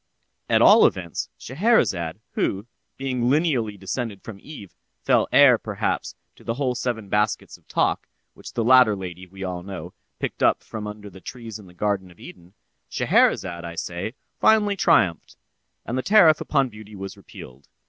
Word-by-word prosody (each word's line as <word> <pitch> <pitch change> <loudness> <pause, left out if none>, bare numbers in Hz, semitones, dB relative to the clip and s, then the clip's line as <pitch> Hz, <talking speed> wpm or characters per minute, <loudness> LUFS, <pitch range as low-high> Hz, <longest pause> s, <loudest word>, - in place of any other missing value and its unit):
At - - +4
all - - +8
events, 85 -4 -4
Scheherazade, 125 - 0
who, 100 +2 -2 0.3
being 130 -3 -1
lineally 130 -9 +1
descended 100 +2 -5
from 105 -4 -9
Eve, 105 - -11 0.3
fell - - +3
heir, - - +6
perhaps, - - -3 0.2
to - - -19
the 115 - -3
whole 130 -2 -1
seven 120 -4 -3
baskets 105 +1 -1
of - - -23
talk, - - 0 0.3
which - - -12
the 115 - -1
latter 125 -3 +6
lady, 90 -1 -8
we 95 +1 -10
all 90 -1 -4
know, 90 -2 -8 0.2
picked - - -5
up - - +3
from 105 -2 -7
under 105 -1 -9
the 95 +1 -14
trees 115 -2 -8
in 100 - -14
the 90 - -17
garden 100 -1 -1
of 85 - -19
Eden; 90 +2 -14 0.3
Scheherazade, 85 -2 +1
I 85 0 -7
say, 85 +8 -5 0.2
finally 210 -2 +4
triumphed, 90 - +2 0.5
and 120 - -3
the - - 0
tariff 165 -4 +5
upon 140 -3 +1
beauty 105 -1 -12
was 95 0 -7
repealed. 65 +2 -13
105 Hz, 170 wpm, -23 LUFS, 95-125 Hz, 0.5 s, all